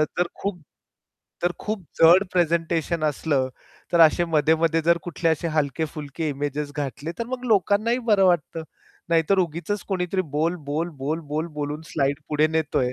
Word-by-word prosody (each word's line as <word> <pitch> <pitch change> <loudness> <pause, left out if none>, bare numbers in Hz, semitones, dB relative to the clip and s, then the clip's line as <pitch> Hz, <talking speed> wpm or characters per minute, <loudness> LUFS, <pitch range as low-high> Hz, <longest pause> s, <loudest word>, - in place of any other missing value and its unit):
अ, - - +5
तर 175 - +3
खूप 195 -4 -4 0.8
तर 175 0 +2
खूप 210 -2 -3 0.2
जड 175 +4 +7
प्रेझेंटेशन 170 -1 0
असलं, 145 -3 0 0.4
तर 170 - +4
असे 165 +2 +6
मध्ये-मध्ये 160 +1 +2
जर 170 0 +4
कुठले 175 -1 -1
असे 160 +1 0
हलके-फुलके 150 +1 -2
इमेजेस 145 +1 -3
घातले 145 +3 -4
तर 235 - -2
मग 255 0 -5
लोकांनाही 215 +2 +2
बरं 195 -2 +5
वाटतं. 165 -2 +1 0.5
नाहीतर 165 +4 +3
उगीचच 175 +4 -1
कोणीतरी 185 0 -1
बोल, 165 +4 +1
बोल, 160 +4 -1
बोल, 155 +5 -2
बोल, 155 +2 -1
बोलून 145 +1 -3
स्लाइड 140 -1 0
पुढे 150 0 +3
नेतोय, 145 -5 0
165 Hz, 155 wpm, -24 LUFS, 150-175 Hz, 0.8 s, जड